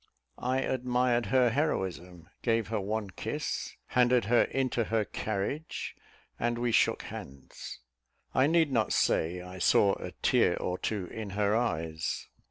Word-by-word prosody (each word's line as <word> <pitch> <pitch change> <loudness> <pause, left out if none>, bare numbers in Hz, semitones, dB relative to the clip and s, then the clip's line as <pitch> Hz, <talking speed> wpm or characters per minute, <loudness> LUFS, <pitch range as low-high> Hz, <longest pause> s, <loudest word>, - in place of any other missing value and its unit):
I 130 +2 0
admired 125 -3 +1
her 125 +2 +4
heroism, 90 - -2
gave 115 -4 +1
her 110 -2 -1
one 105 0 -2
kiss, - - -4
handed 125 -2 +3
her 120 +3 +4
into 130 -3 0
her 110 -1 +1
carriage, 110 +12 -3 0.4
and 120 0 0
we 120 0 0
shook - - +3
hands. 65 -2 -9 0.5
I 130 +2 +4
need 160 -2 +3
not 115 -4 +1
say 85 +3 +1
I 90 +1 -9
saw 100 +2 +4
a - - -6
tear - - +4
or 90 0 -2
two 105 -4 -2
in 110 +3 -6
her 105 0 +2
eyes. 80 -9 -2
110 Hz, 145 wpm, -30 LUFS, 95-125 Hz, 0.5 s, her